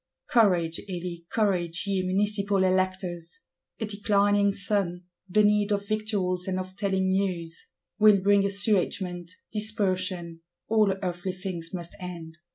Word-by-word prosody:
Courage, 180 -8 +3
Elie! 175 -2 -5
Courage, 180 -5 0
ye 195 -2 0
Municipal 200 +1 +1
Electors! 185 - -1 0.4
A 220 - -1
declining 205 -1 +2
sun; 200 -3 -1 0.3
the 210 +3 +4
need 210 0 +3
of 200 0 -1
victuals, 200 -4 -1
and 185 -1 -1
of 185 0 -5
telling 190 -2 0
news, 180 -4 -2 0.3
will 210 -2 +7
bring 200 +1 +4
assuagement, 195 -3 0 0.2
dispersion: 185 -6 -2 0.3
all 215 -2 +3
earthly 180 +1 -3
things 180 -3 -5
must 175 -2 -4
end. 170 -3 -8
190 Hz, 125 wpm, -27 LUFS, 180-205 Hz, 0.4 s, will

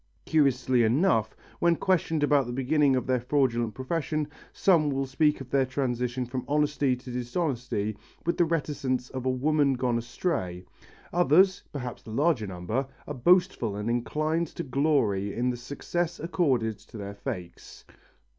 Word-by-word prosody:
Curiously 130 -4 +3
enough, 115 - +2 0.2
when 170 0 +4
questioned 165 -4 +1
about 145 -3 +3
the - - -4
beginning 135 +2 +2
of 125 -2 -1
their 130 -1 +1
fraudulent 120 -4 0
profession, 150 +2 -2 0.2
some 165 -6 +3
will 135 -1 -1
speak 150 +3 +2
of 130 - -10
their 135 -1 +3
transition 125 -2 -1
from 125 +1 -4
honesty 145 -2 +1
to 125 0 -10
dishonesty 120 - -2 0.3
with 170 - +1
the 175 - +5
reticence 140 -6 -2
of 130 -1 -4
a - - +3
woman 140 +2 +2
gone 125 -2 0
astray; 115 - -3 0.5
others, 180 +3 +4
perhaps 125 -5 -5
the - - -12
larger 135 -2 +1
number, 95 +9 -3 0.2
are 150 - -5
boastful 160 - +2
and 105 +3 -2
inclined 155 +7 0
to 170 - -6
glory 130 -9 +1
in 125 +1 +1
the 120 - -5
success 160 +7 -3
accorded 135 - 0
to - - -13
their 100 -1 -6
fakes. 90 -3 -7
130 Hz, 155 wpm, -27 LUFS, 120-155 Hz, 0.5 s, the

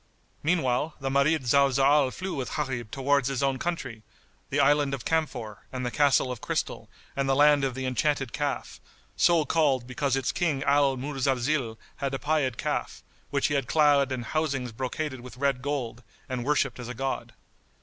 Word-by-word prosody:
Meanwhile, 150 -2 0
the 135 -1 -2
Marid 140 +1 +2
Zalzal 140 +2 +4
flew 185 +5 -5
with 130 -2 -4
Gharib 130 -7 -3
towards 135 +1 +1
his 135 0 -1
own 135 -1 +1
country, 130 -10 -4 0.5
the 145 - 0
Island 145 0 +3
of 125 - -10
Camphor 145 -10 -2
and 130 -1 -4
the 125 - -2
Castle 140 -3 +3
of 125 - -6
Crystal - - -3 0.3
and 135 -1 0
the 135 - +3
Land 145 0 +5
of 130 -2 -1
the 130 0 -4
Enchanted 135 0 0
Calf, 145 -2 -3 0.4
so 170 -3 +4
called 145 -7 +2
because 135 +1 -1
its 135 - 0
King 150 -6 0
Al 140 -1 +3
Muzalzil, 135 -2 -1 0.2
had 140 -1 -2
a - - -1
pied 145 -5 0
calf, - - -3 0.3
which 140 0 0
he 145 - +1
had 135 -4 0
clad 145 -1 +4
in 130 -2 -2
housings 135 -3 -2
brocaded 130 +3 -4
with 125 -1 -11
red 135 -1 0
gold, 125 -4 -3 0.3
and 130 -3 -3
worshipped 140 -4 +1
as 125 - -6
a 125 - -6
god. 135 +2 -3
135 Hz, 180 wpm, -27 LUFS, 130-145 Hz, 0.5 s, Land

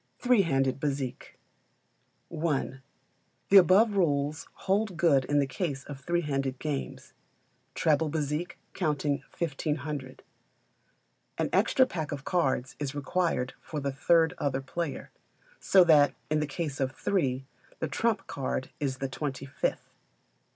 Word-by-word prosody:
Three 245 -4 +4
Handed 135 -6 +1
Bezique. 135 -3 -3 1.0
i. 155 -3 0 0.8
The 200 - +8
above 195 +4 +6
rules 150 -4 0 0.2
hold 195 -1 +1
good 150 -6 +4
in 145 - +1
the 140 - +4
case 135 -1 -3
of 140 -2 -8
three 170 +5 0
handed 135 -4 -2
games 145 -1 -5 0.6
treble 155 0 +2
bézique 150 +2 -2 0.2
counting 150 -4 0 0.2
1,500. 150 -4 -3 1.1
An - - 0
extra 260 - +4
pack 160 - -4
of 140 -2 -5
cards 135 -8 0
is 145 -1 -3
required 145 -3 -1
for 155 - -5
the 140 -1 -2
third 160 +4 +3
other 135 -2 -1
player; 155 +3 -4 0.5
so 190 -2 +6
that, 150 -4 +5 0.2
in 155 - +3
the 150 - -1
case 150 -2 -4
of 135 -1 0
three, 135 -10 -1 0.3
the 160 - -2
trump 205 +6 0
card 130 -1 -3
is 135 -3 -1
the 135 - -2
twenty 135 0 -4
fifth. 135 +1 -3
145 Hz, 135 wpm, -29 LUFS, 135-170 Hz, 1.1 s, The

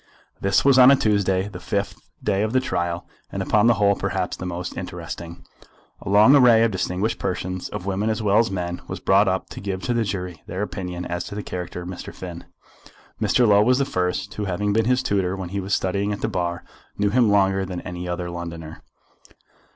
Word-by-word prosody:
This 100 +5 +2
was 135 -2 +6
on 125 0 +9
a 140 - +7
Tuesday, 100 -5 +1
the 100 -4 -8
fifth 100 +2 -2 0.3
day 95 - +1
of 110 +2 -1
the 130 - +4
trial, 85 -8 -2 0.3
and - - -3
upon 105 +1 +3
the 120 - +5
whole 100 -1 +3
perhaps - - -2
the 90 - -6
most 90 0 -5
interesting. 85 0 -7 0.6
A - - -6
long 105 +7 +7
array 120 -4 +6
of 115 - +2
distinguished 95 +2 -1
persons, 90 -1 -3
of 105 -3 -6
women 100 +3 -1
as 110 - -1
well 105 -1 +3
as 115 0 +2
men, 90 -2 -4
was - - -5
brought 100 +2 +4
up 95 0 -1
to - - -7
give 95 -1 -4
to 120 - 0
the 115 -1 +1
jury 90 -5 -4
their 95 +4 -3
opinion 90 -3 -5
as 85 0 -3
to 100 - -7
the 105 - -4
character 90 -1 -5
of - - -8
Mr. 90 -1 -7
Finn. 85 -2 -8 0.8
Mr. 125 -2 +3
Low 100 -1 +6
was 125 +4 +4
the 140 - +1
first, 90 -2 -2
who 105 - -3
having 100 +2 -1
been 110 +1 +2
his 125 +2 +2
tutor 95 -4 0
when 95 -2 -6
he 100 +2 -3
was 100 +1 0
studying 100 +2 -1
at 100 - -4
the - - 0
bar, 85 -4 -2 0.3
knew 100 0 +1
him 120 -1 +4
longer 95 -1 +3
than 90 -2 -5
any 90 0 -6
other 90 0 -3
Londoner. 85 -2 -7
95 Hz, 220 wpm, -23 LUFS, 90-105 Hz, 0.8 s, on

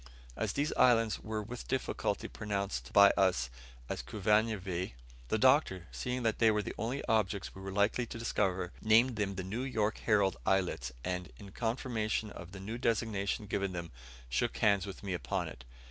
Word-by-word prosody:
As - - -1
these 145 +2 0
islands 115 -3 +4
were 110 -1 -4
with 120 +3 -7
difficulty 130 - -1
pronounced 100 -12 -3
by 100 -1 +8
us 90 -11 +2 0.4
as - - -3
Kavunvweh, 100 - 0 0.3
the - - +1
Doctor, 90 -2 +4
seeing 125 0 -3
that 115 -2 +1
they 115 - +6
were 105 -1 +2
the - - -5
only 120 +6 -3
objects 105 -4 0
we 95 - -10
were 95 0 -5
likely 105 +5 +1
to - - -7
discover, 95 -5 0
named 115 +3 +5
them 100 -2 -1
the 95 - -3
"'New 105 +7 -3
York 110 -5 0
Herald' 100 -4 +2
Islets;" 90 -10 +1
and, 90 -1 -3
in 100 -2 -11
confirmation 110 -2 -1
of 85 0 -9
the 95 - -8
new 110 +5 -5
designation 110 -3 0
given 100 -1 -1
them, 85 -2 -5 0.4
shook - - 0
hands 100 -2 +3
with 95 - -8
me 95 -2 -2
upon 65 -8 -2
it. - - -10
100 Hz, 175 wpm, -33 LUFS, 95-115 Hz, 0.4 s, by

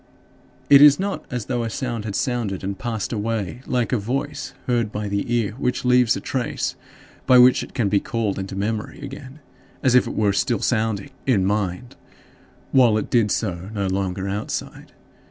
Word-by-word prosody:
It 140 -1 +8
is 145 +1 +8
not 200 +1 -3
as 125 -4 -4
though 120 -2 -1
a 115 - -2
sound 115 -2 -4
had 105 -3 -4
sounded 120 -8 -2
and 95 0 -4
passed 110 -5 -3
away 110 +1 -3
like 125 0 0
a 125 - +2
voice 135 +7 -4
heard 120 -4 0
by 105 -1 -3
the 100 +3 -2
ear 115 -4 +1
which 125 -1 -1
leaves 125 -2 +4
a - - -3
trace - - -2 0.5
by 130 -1 +7
which 125 +1 +6
it - - -9
can 115 - +1
be 100 0 +2
called 110 -4 -2
into 95 0 -5
memory 105 +2 -3
again, 140 +1 -9 0.4
as 130 -3 +3
if 125 - +5
it - - -5
were 105 -2 +2
still 115 +4 +1
sounding 110 -3 -1 0.2
in 105 -8 +3
mind 105 +3 -2 0.8
while 120 -5 +5
it 110 - -4
did 115 -4 +3
so 95 -4 -2
no 100 -1 -1
longer 95 0 -2
outside. 105 +2 -5
115 Hz, 185 wpm, -22 LUFS, 100-125 Hz, 0.8 s, It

